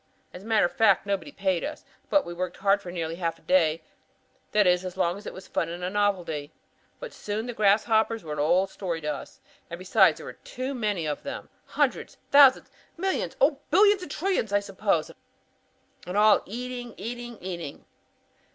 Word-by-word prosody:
As 180 Hz, -, -9 dB
a 205 Hz, -, -12 dB
matter 220 Hz, -4 st, +4 dB
of 175 Hz, -, -1 dB
fact 200 Hz, -4 st, +3 dB
nobody 200 Hz, -5 st, -2 dB
paid 190 Hz, -3 st, -1 dB
us, 305 Hz, +1 st, -6 dB, 0.2 s
but 295 Hz, -, +3 dB
we 175 Hz, -, -6 dB
worked 180 Hz, 0 st, -4 dB
hard 200 Hz, +1 st, +2 dB
for 175 Hz, -, -8 dB
nearly 165 Hz, -1 st, -4 dB
half 170 Hz, -2 st, -2 dB
a -, -, -25 dB
day; 165 Hz, -3 st, +2 dB, 0.7 s
that 210 Hz, -1 st, +4 dB
is 180 Hz, 0 st, +3 dB
as 185 Hz, -1 st, -6 dB
long 170 Hz, +1 st, +1 dB
as 200 Hz, -, -10 dB
it -, -, -4 dB
was 190 Hz, -, -11 dB
fun 165 Hz, -, -1 dB
and 180 Hz, +2 st, -4 dB
novelty. 180 Hz, -8 st, -1 dB, 0.5 s
By -, -, -7 dB, 0.2 s
noon 210 Hz, +2 st, -2 dB
the 245 Hz, -, -5 dB
grasshoppers 220 Hz, +1 st, +2 dB
were 155 Hz, -2 st, -5 dB
an 150 Hz, -, -5 dB
old 180 Hz, +6 st, +2 dB
story 175 Hz, -4 st, -4 dB
to 150 Hz, -1 st, -2 dB
us. 140 Hz, -, -10 dB, 0.3 s
And 170 Hz, -, -6 dB
besides 185 Hz, +1 st, +4 dB
there -, -, -10 dB
were -, -, -7 dB
too 260 Hz, +2 st, -5 dB
many 210 Hz, -9 st, -1 dB
of 150 Hz, -1 st, -3 dB
them. 280 Hz, -, -7 dB, 0.2 s
Hundreds, -, -, -1 dB
thousands, 280 Hz, -2 st, +6 dB, 0.3 s
millions, 380 Hz, +2 st, -1 dB
oh, 280 Hz, +1 st, +3 dB
billions 405 Hz, +3 st, +5 dB
and 360 Hz, -, -7 dB
trillions 330 Hz, -, -1 dB
I 205 Hz, -, +3 dB
suppose. 195 Hz, -4 st, -1 dB, 1.0 s
And 180 Hz, +3 st, -3 dB
all 215 Hz, 0 st, +6 dB
eating, 245 Hz, +2 st, -6 dB
eating, 240 Hz, 0 st, -6 dB
eating! 170 Hz, -5 st, -7 dB
200 Hz, 190 wpm, -26 LUFS, 175-235 Hz, 1.0 s, thousands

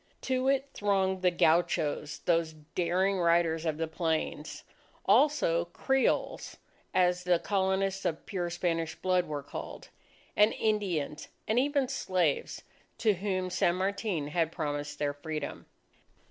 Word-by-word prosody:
To 260 Hz, 0 st, 0 dB
it 275 Hz, 0 st, +2 dB
thronged 190 Hz, -2 st, +1 dB
the 180 Hz, -, +4 dB
gauchos, 160 Hz, -3 st, +1 dB
those 165 Hz, -2 st, +2 dB, 0.2 s
daring 185 Hz, +2 st, +1 dB
riders 170 Hz, -1 st, +2 dB
of 155 Hz, -1 st, -1 dB
the 165 Hz, 0 st, -1 dB
plains, 160 Hz, -2 st, -2 dB, 0.4 s
also 205 Hz, -, +3 dB
Creoles 265 Hz, +10 st, 0 dB, 0.3 s
as 180 Hz, -1 st, +2 dB
the 180 Hz, -1 st, +3 dB
Colonists 195 Hz, +1 st, 0 dB
of 160 Hz, -, -2 dB
pure 180 Hz, -3 st, -2 dB
Spanish 165 Hz, -2 st, -1 dB
blood 185 Hz, -1 st, +1 dB
were 145 Hz, -2 st, -4 dB
called, -, -, -8 dB, 0.5 s
and 210 Hz, +2 st, +5 dB
Indians, 190 Hz, -9 st, -1 dB, 0.2 s
and 220 Hz, +3 st, +3 dB
even 280 Hz, 0 st, +1 dB
slaves, 185 Hz, -, -1 dB, 0.3 s
to 220 Hz, -3 st, +3 dB
whom 185 Hz, -1 st, -2 dB
San 175 Hz, -1 st, +2 dB
Martin 190 Hz, -5 st, -1 dB
had 165 Hz, 0 st, 0 dB
promised 145 Hz, -3 st, -3 dB
their 145 Hz, -1 st, -1 dB
freedom. 150 Hz, +1 st, -5 dB
180 Hz, 130 wpm, -30 LUFS, 160-195 Hz, 0.5 s, and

